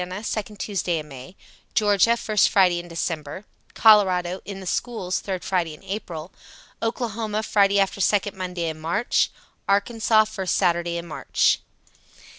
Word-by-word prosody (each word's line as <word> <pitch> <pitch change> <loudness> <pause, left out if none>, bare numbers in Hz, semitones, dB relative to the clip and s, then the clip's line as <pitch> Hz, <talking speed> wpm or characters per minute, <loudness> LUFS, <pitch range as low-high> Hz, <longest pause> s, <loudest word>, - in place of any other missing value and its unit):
second 215 -1 -4
Tuesday 185 -4 -1
in 155 -1 -6
May; 135 +5 -11 0.4
Ga., 210 +2 +4
first 215 -3 +2
Friday 180 -3 +4
in 175 - -9
December; 165 +1 -4 0.3
Col. 215 -2 +8 0.4
(in 200 -1 -7
the 190 - -9
schools), 185 -2 -2
third 190 -3 -4
Friday 170 -5 -1
in - - -19
Apr.; 185 -4 -6 0.5
Okla., 225 -2 -2
Friday 200 -1 +3
after 195 0 0
second 200 +1 +1
Monday 180 -2 -3
in 160 -1 -5
March; 170 +9 +1 0.4
Ark., 200 +3 +2 0.4
first 190 -3 -2
Saturday 170 -2 +1
in 170 - -5
March. 155 -2 +1
190 Hz, 140 wpm, -23 LUFS, 170-210 Hz, 0.5 s, Col